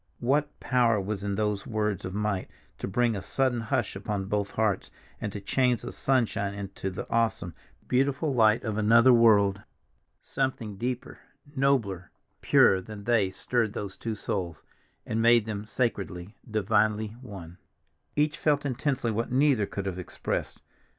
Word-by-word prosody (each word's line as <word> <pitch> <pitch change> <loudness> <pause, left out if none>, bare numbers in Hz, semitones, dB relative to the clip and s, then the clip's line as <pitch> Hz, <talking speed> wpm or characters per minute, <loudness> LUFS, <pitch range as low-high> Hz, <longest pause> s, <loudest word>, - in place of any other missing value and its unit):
What 145 +4 0
power 120 -4 +2
was 100 0 -4
in 100 -1 -1
those 105 -1 -1
words 105 -3 -1
of 95 +1 -5
might 105 -3 -1 0.3
to - - -3
bring 115 +3 +1
a 100 - -4
sudden 130 +2 0
hush 120 -1 -1
upon 100 0 -3
both 100 0 -1
hearts, 110 -3 0 0.3
and 105 - -3
to 100 - -5
change 125 +3 +1
the 120 - -5
sunshine 110 -6 0
into 100 -1 -5
the 95 - -6
awesome, 115 -7 0 0.3
beautiful 140 +3 +1
light 110 -2 +4
of 110 -2 -2
another 115 +4 +6
world? 105 -4 +5 0.6
Something 130 -6 -2
deeper, 120 +4 -4 0.4
nobler, 115 -10 +1 0.3
purer 95 -1 +5
than 105 +1 -9
they 110 -3 +2
stirred 110 +3 -1
those 100 -2 -5
two 115 -1 -4
souls, 90 -6 -4 0.4
and 110 - -1
made 115 -1 +5
them 105 -1 -5
sacredly, 100 -6 -2
divinely 110 0 +1
one. 90 -7 -10 0.6
Each 150 0 +1
felt 145 -1 +1
intensely 130 -2 -1
what 115 +2 -2
neither 130 -6 +3
could 100 - -5
have 95 -1 -3
expressed. 90 - -4
110 Hz, 150 wpm, -27 LUFS, 100-120 Hz, 0.6 s, another